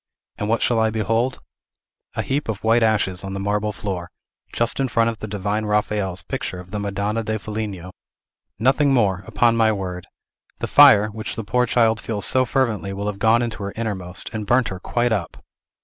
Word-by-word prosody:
And 105 - -2
what 115 - +1
shall 120 -2 +2
I 110 0 +3
behold? 115 +4 -1 0.7
A - - -1
heap 140 -2 -2
of 105 -3 -4
white 115 +2 +3
ashes 105 -5 +2
on 95 0 -5
the 100 - -4
marble 105 +2 -1
floor, 95 -4 -5 0.4
just 120 +2 -1
in 135 - +1
front 115 -1 +2
of 110 - -11
the 110 - -5
divine 105 +1 -2
Raphael's 105 -3 -1
picture 90 - -4
of 90 0 -12
the 105 - -3
Madonna 100 +2 -2
da 110 0 -2
Foligno! 105 -4 -5 0.7
Nothing 135 +5 +3
more, 95 -6 +1
upon 115 +2 +2
my 110 -1 +3
word! 90 -3 -5 0.5
The - - -3
fire, 120 -8 +7
which 110 +1 -6
the 115 - -4
poor 125 +4 +1
child 115 -2 +2
feels 105 -4 -2
so 130 +5 +3
fervently, 115 -6 -1
will 100 +1 -4
have 105 -1 -3
gone 115 +2 +4
into 115 -2 -4
her 100 0 -4
innermost, 95 -6 -1
and 105 -2 -4
burnt 120 -1 +3
her 95 - -6
quite 120 +5 0
up!" 95 -7 -3
110 Hz, 195 wpm, -22 LUFS, 100-115 Hz, 0.7 s, fire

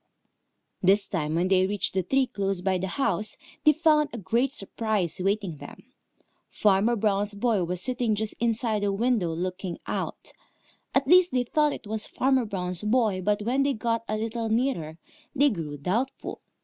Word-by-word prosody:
This 195 +2 +4
time 155 -5 -2
when 175 +2 +1
they 185 0 +3
reached 205 0 -1
the 190 - +1
tree 270 +8 +2
close 195 -5 -2
by 190 0 +1
the 190 - -2
house, 210 -2 -1 0.3
they 305 - +7
found 305 -1 +3
a - - -6
great 235 +6 0
surprise 205 - -2
awaiting 195 -3 -1
them. - - -13 0.6
Farmer 210 +3 +2
Brown's 205 -1 0
boy 210 -3 +1
was 180 +1 -3
sitting 245 -4 0
just 215 0 -3
inside 230 -2 0
the 205 0 +1
window, 210 -4 +1
looking 180 +1 -4
out. - - -4 0.6
At 270 0 +3
least, 360 +3 +6
they 250 -1 +2
thought 300 +4 +2
it - - -7
was 215 +1 -3
Farmer 265 -2 +1
Brown's 180 -4 -3
boy, 215 -3 +1
but 205 +2 0
when 250 +5 +1
they 280 0 +2
got 230 0 -1
a 215 - -1
little 225 +1 -3
nearer, 220 - -1 0.4
they 285 0 +4
grew 155 -7 -5
doubtful. 215 - -3
210 Hz, 175 wpm, -26 LUFS, 190-245 Hz, 0.6 s, they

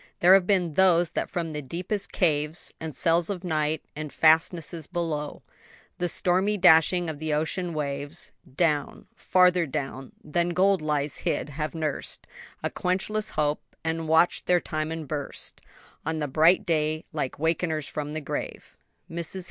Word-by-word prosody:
There 180 +2 +7
have 190 -2 +5
been 180 -5 +2
those 175 -1 +4
that - - -2
from 170 -2 -3
the 150 -1 -4
deepest 180 +9 -3
caves, 150 -2 0
And 160 -2 -5
cells 170 +1 +2
of 190 -3 -4
night 155 -2 0
and 150 -1 -5
fastnesses 160 0 +2
below 160 -4 -3 0.6
The 175 0 0
stormy 190 +5 +1
dashing 175 0 +5
of 155 -2 -5
the 155 -1 -1
ocean 170 +3 -1
waves, 145 +2 -3 0.2
Down, 150 -3 0
farther 180 -2 +3
down 135 -1 -5
than 170 +3 -1
gold 195 0 +3
lies 150 -2 -1
hid, - - -2
have 150 +2 -4
nurs'd 155 -3 -3 0.4
A - - -1
quenchless 210 +4 -1
hope, 150 -1 0 0.2
and 165 0 -2
watch'd 160 +2 +3
their 180 0 +4
time 155 -1 -3
and 160 -2 -5
burst 145 -1 -5 0.4
On 160 +1 -2
the 150 -1 -1
bright 160 +8 +4
day 155 -1 0
like 145 -4 -3
wakeners 160 -1 0
from 150 0 -4
the 155 - -3
grave." 145 - -5 0.3
MRS. 170 +2 -4
160 Hz, 155 wpm, -26 LUFS, 150-175 Hz, 0.6 s, There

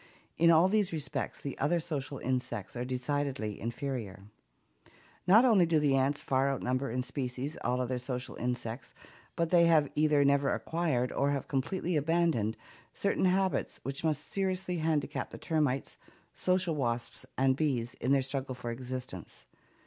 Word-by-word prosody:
In 170 +1 +4
all 165 +2 +6
these 205 -1 +2
respects 150 -4 -3
the 140 - -4
other 165 +5 +2
social 145 -3 -4
insects 125 -6 -3
are 120 - -2
decidedly 130 -4 -2
inferior.... 115 -4 -4 1.0
Not 220 +7 +7
only 205 -8 +5
do 165 -1 +3
the 145 -2 +3
ants 135 +2 +1
far 135 +1 +1
outnumber 130 0 -1
in 125 +2 -1
species 130 +2 -4
all 125 +1 +1
other 125 0 -1
social 125 0 -4
insects, 120 0 -4 0.4
but 170 -1 0
they 170 -1 +6
have 155 -4 +4
either 150 -2 +3
never 140 0 +3
acquired, 155 -7 -1
or 140 - +1
have 140 -1 -2
completely 165 +6 -1
abandoned, 150 -8 +1 0.4
certain 200 -1 +1
habits 190 +1 +1
which 135 +2 -4
must 155 -2 0
seriously 185 -2 -1
handicap 155 -3 -1
the - - -9
termites, 150 -5 -1 0.3
social 185 -2 +1
wasps 120 -5 -2
and 130 0 +3
bees 130 -5 -1
in 130 - +1
their 140 -1 +4
struggle 135 -1 -3
for 120 -1 -5
existence. 125 -6 -7
140 Hz, 155 wpm, -31 LUFS, 125-160 Hz, 1.0 s, Not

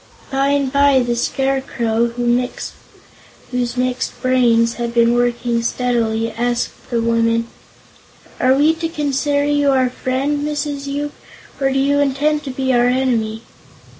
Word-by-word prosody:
By 270 +1 +1
and 280 -1 0
by 280 -2 +4
the 240 -1 -1
Scarecrow, 240 -3 0
whose 245 0 -4
mixed 250 0 -2
brains 235 -3 +3
had 235 0 -4
been 235 0 +4
working 240 -1 0
steadily, 230 -2 0
asked 240 0 -3
the 235 - 0
woman: 230 0 +1 0.9
"Are 260 +1 +4
we 300 +3 +4
to 330 0 -3
consider 285 -2 0
you 290 -1 +2
our 260 -2 +2
friend, 265 +4 -1
Mrs. 290 -1 -3
Yoop, 290 +1 -3 0.5
or 270 -1 +1
do 270 - 0
you 280 +1 +2
intend 290 +2 +1
to - - -4
be 260 0 -1
our 240 0 +3
enemy?" 235 -4 0
255 Hz, 135 wpm, -18 LUFS, 240-280 Hz, 0.9 s, by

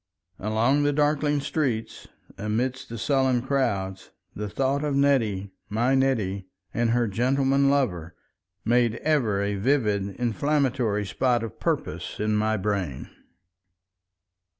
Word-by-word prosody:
Along 110 +8 +2
the 145 0 +2
darkling 150 0 +2
streets, 130 -7 -2 0.3
amidst 125 +5 -2
the 115 - -6
sullen 130 -1 +1
crowds, 100 -9 -1 0.3
the 105 0 -4
thought 135 +5 0
of 145 -2 0
Nettie, 115 -9 +1 0.2
my 120 +5 +1
Nettie, 110 -8 0 0.3
and 120 0 +1
her 120 0 +2
gentleman 135 +5 +2
lover 90 - 0 0.5
made 120 0 +3
ever 120 -11 +1
a 100 0 -1
vivid 105 -5 +1
inflammatory 125 -3 0
spot 120 +3 +1
of 115 - -7
purpose - - -2
in 105 0 +1
my 110 +1 +1
brain. 95 -9 -3
120 Hz, 120 wpm, -25 LUFS, 105-135 Hz, 0.5 s, made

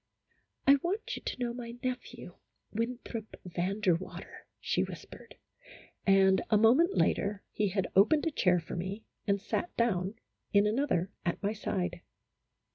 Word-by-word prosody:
" - - -42
I 280 +1 +8
want 395 +6 -2
you - - -7
to - - -4
know 240 -1 -1
my 240 -1 -7
nephew, 255 -1 -5 0.3
Winthrop 230 -1 -4
Van 180 +4 -2
der 185 -4 +4
Water," 175 +3 -7
she - - +1
whispered, - - -10 0.7
and 190 -1 +5
a 215 - +5
moment 260 - +5
later 200 0 +1
he 210 - 0
had 190 -1 -1
opened 260 - +5
a 325 - +1
chair 180 -10 +3
for 165 - -7
me, 190 +5 -4 0.2
and 200 0 +2
sat 280 - -3
down 200 -4 +1 0.4
in 200 0 +5
another 210 -5 +1
at 170 +4 -2
my 205 +2 +1
side. 180 -4 -3
210 Hz, 155 wpm, -31 LUFS, 190-240 Hz, 0.7 s, I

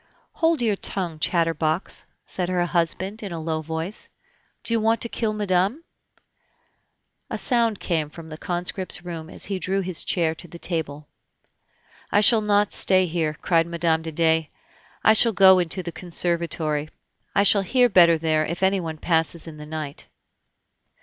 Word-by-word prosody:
"Hold 325 -5 0
your 215 -3 +1
tongue, 175 -6 +1
chatterbox," 165 0 0 0.2
said 180 -1 0
her 180 -1 0
husband, 180 +5 -2
in 200 -3 -6
a 165 - -5
low 160 0 -3
voice; 160 +5 -4 0.5
"do 230 - -1
you 230 - +2
want 225 +1 +2
to 235 - +4
kill 225 -2 -2
madame?" 205 - 0 1.5
A - - -3
sound 230 -5 +1
came 160 -4 -2
from 160 +1 -12
the 155 - -8
conscript's 180 0 -3
room 165 -2 -7
as - - -4
he 195 -2 -3
drew 190 +3 -1
his 185 -3 -3
chair 165 -3 0
to 170 +2 -11
the 170 - -11
table. 155 -4 -3 1.0
"I 205 - +4
shall 220 +1 +6
not 205 -1 +1
stay 185 -1 +4
here," 160 -3 -2
cried 165 -2 +2
Mme. 165 -1 0
de 160 0 -6
Dey; 160 -1 +1 0.5
"I 220 - +6
shall 225 +1 +6
go 190 -1 +6
into 180 +1 -2
the 170 - -5
conservatory; 165 -3 -1 0.5
I 200 - +4
shall 200 0 +6
hear 250 +6 +3
better 170 -6 +5
there 155 -1 0
if 170 +4 -4
anyone 185 -5 0
passes 165 0 -1
in 160 -2 -10
the 150 0 -10
night." 155 -2 -7
175 Hz, 165 wpm, -23 LUFS, 160-195 Hz, 1.5 s, shall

